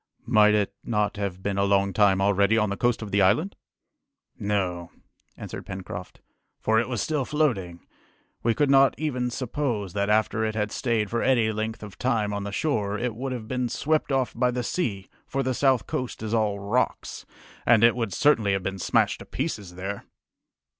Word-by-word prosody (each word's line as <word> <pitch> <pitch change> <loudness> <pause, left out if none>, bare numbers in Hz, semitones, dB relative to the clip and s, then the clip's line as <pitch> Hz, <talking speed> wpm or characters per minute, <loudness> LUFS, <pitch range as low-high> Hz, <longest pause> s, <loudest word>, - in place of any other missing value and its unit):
"Might 105 -2 +5
it 100 -2 0
not 105 -3 -1
have 95 -2 -4
been 100 -1 -1
a - - +3
long 100 0 +2
time 95 -2 +4
already 100 +2 +3
on 105 -2 +1
the - - -1
coast 120 +1 0
of 105 - -7
the 100 - +3
island?" 115 - +2 0.8
"No," 95 -4 -1 0.5
answered - - -8
Pencroft, 95 -1 -7 0.4
"for 110 0 +2
it 120 - -1
was 120 -3 -1
still 150 -3 0
floating. 115 - -1 0.6
We 115 -1 +1
could 145 -2 +2
not 135 0 +5
even 125 -5 -1
suppose 120 - -3
that 100 0 0
after 110 +1 +2
it 110 0 -1
had 105 -2 -1
stayed 115 -5 -1
for 115 - 0
any 120 -4 +3
length 110 +1 -4
of 100 -3 -10
time 110 -5 0
on 100 0 -3
the 100 - -4
shore, 105 -6 -1
it 120 +1 -2
would 130 +3 -4
have 120 -4 -5
been 125 0 -1
swept 155 +4 0
off 135 -2 0
by 125 +1 +2
the 125 0 -2
sea, 105 - -2 0.2
for 135 0 -1
the 130 0 0
south 130 -5 +2
coast 125 -3 -4
is 110 0 -3
all 105 -3 +1
rocks, 100 +6 -2 0.4
and 115 -1 +5
it 115 0 +6
would 115 -4 -2
certainly 115 -9 +3
have 95 -1 -1
been 95 0 -3
smashed - - +1
to - - -10
pieces 105 - -4
there!" 95 +2 -5
110 Hz, 195 wpm, -25 LUFS, 100-125 Hz, 0.8 s, it